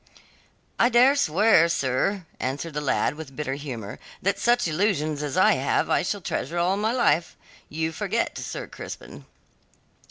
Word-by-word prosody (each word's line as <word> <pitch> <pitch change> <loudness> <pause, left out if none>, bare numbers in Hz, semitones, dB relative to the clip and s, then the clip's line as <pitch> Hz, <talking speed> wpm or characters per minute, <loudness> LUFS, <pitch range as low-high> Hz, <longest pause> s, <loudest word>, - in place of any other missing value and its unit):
"I 235 - +5
dare 255 +3 +5
swear, 185 - +4
sir," 165 +7 0
answered 140 +5 -3
the 150 - -2
lad, 140 -1 +1
with 150 -3 -10
bitter 145 -2 -3
humour, 125 -8 -6 0.2
"that 200 +2 0
such 240 -1 +2
illusions 155 -4 0
as 145 -2 -3
I - - +6
have - - 0
I - - +3
shall - - -2
treasure 170 - -3
all 175 +3 +2
my 215 +2 0
life. 175 -10 +1 0.3
You 160 +1 -2
forget, 205 +6 -2
Sir - - -5
Crispin." - - -10
165 Hz, 155 wpm, -25 LUFS, 145-205 Hz, 0.3 s, I